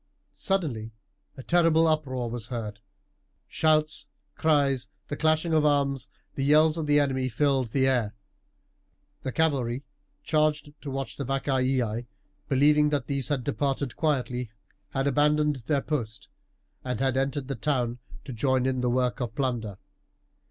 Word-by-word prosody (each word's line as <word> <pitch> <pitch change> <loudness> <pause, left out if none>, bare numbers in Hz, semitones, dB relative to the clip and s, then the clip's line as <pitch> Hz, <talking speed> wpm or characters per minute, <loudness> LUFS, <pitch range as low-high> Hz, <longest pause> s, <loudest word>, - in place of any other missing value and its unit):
Suddenly 135 - -2 0.4
a 130 - -8
terrible 165 -1 +4
uproar 140 -6 0
was 115 -1 -4
heard 110 -4 -5 0.7
shouts, 155 -1 +1 0.2
cries, 140 -5 +2 0.2
the 145 - -2
clashing 160 +2 +1
of 155 -1 +4
arms, 140 -3 +1 0.3
the 135 - -2
yells 155 +2 +5
of 160 -2 -3
the 145 0 +5
enemy, 130 -2 0
filled 135 +1 +1
the 130 +4 +1
air. 120 -6 +1 1.1
The 130 - -3
cavalry 135 -5 0 0.4
charged 155 -1 +1
to 145 - -6
watch 135 0 -4
the 140 - -3
Vacaei, 130 -3 0 0.4
believing 150 +2 +4
that 145 -4 -1
these 140 -2 -1
had 145 -4 -1
departed 140 -2 -1
quietly, 125 -6 -1 0.4
had 135 0 -1
abandoned 150 +1 +2
their 145 -3 +2
post, 120 -8 -4 0.5
and 125 -3 -3
had 135 -1 +1
entered 135 0 -1
the 140 - -2
town 125 -1 -1 0.3
to 135 - -6
join 130 +2 +1
in 130 -1 0
the 125 - +1
work 125 0 0
of 120 -3 -4
plunder. 120 -7 -2
135 Hz, 145 wpm, -27 LUFS, 125-150 Hz, 1.1 s, yells